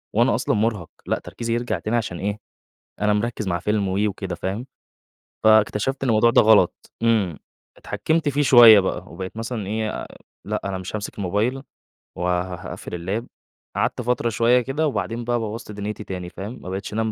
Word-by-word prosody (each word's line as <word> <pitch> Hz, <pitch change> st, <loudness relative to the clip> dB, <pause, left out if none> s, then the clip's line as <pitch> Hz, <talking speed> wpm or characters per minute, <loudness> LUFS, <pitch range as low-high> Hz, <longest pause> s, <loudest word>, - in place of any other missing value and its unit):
وأنا -, -, +4 dB
أصلًا -, -, 0 dB
مُرهَق، 105 Hz, -6 st, 0 dB, 0.2 s
لأ -, -, 0 dB
تركيزي 115 Hz, -1 st, -4 dB
يرجع 120 Hz, +1 st, -1 dB
تاني 110 Hz, +3 st, -1 dB
عشان 100 Hz, -6 st, -3 dB
إيه، 105 Hz, +2 st, -2 dB, 0.6 s
أنا 105 Hz, 0 st, +3 dB
مركِّز 110 Hz, -1 st, -2 dB
مع 85 Hz, -2 st, 0 dB
فيلم 105 Hz, 0 st, 0 dB
و 95 Hz, +1 st, -1 dB
وكده 100 Hz, -, -4 dB
فاهم، 100 Hz, +7 st, -4 dB, 0.8 s
فاكتشفت 110 Hz, +5 st, +3 dB
إن -, -, 0 dB
الموضوع 115 Hz, +1 st, +5 dB
ده -, -, +6 dB
غلط، 105 Hz, -5 st, +3 dB
إمم، 105 Hz, -9 st, +2 dB, 0.4 s
اتحكّمت 160 Hz, -1 st, -1 dB
فيه 145 Hz, +1 st, +1 dB
شوية 120 Hz, -6 st, +9 dB
بقى، 95 Hz, -1 st, -3 dB
وبقيت 95 Hz, +5 st, -7 dB
مثلًا 115 Hz, -3 st, -4 dB
إيه، 110 Hz, +1 st, -3 dB, 0.4 s
لأ -, -, -2 dB
أنا 95 Hz, -1 st, -2 dB
مش 95 Hz, +3 st, -5 dB
هامسك 105 Hz, 0 st, -6 dB
الموبايل، 105 Hz, +8 st, 0 dB, 0.6 s
وه 90 Hz, +1 st, -1 dB
هاقفِّل -, -, -8 dB, 0.3 s
الLap، -, -, -14 dB, 0.5 s
قعدت -, -, 0 dB
فترة 120 Hz, 0 st, 0 dB
شوية 120 Hz, +3 st, +3 dB
كده 150 Hz, +5 st, -1 dB
وبعدين 115 Hz, -1 st, -2 dB
بقى 120 Hz, 0 st, 0 dB
بوّظت 110 Hz, 0 st, -5 dB
دُنيتي 105 Hz, +1 st, -5 dB
تاني 90 Hz, -3 st, -6 dB
فاهم، 105 Hz, +8 st, -8 dB
ما 95 Hz, -, -8 dB
بقيتش 95 Hz, +2 st, -5 dB
أنام 110 Hz, 0 st, 0 dB
110 Hz, 175 wpm, -23 LUFS, 100-120 Hz, 0.8 s, شوية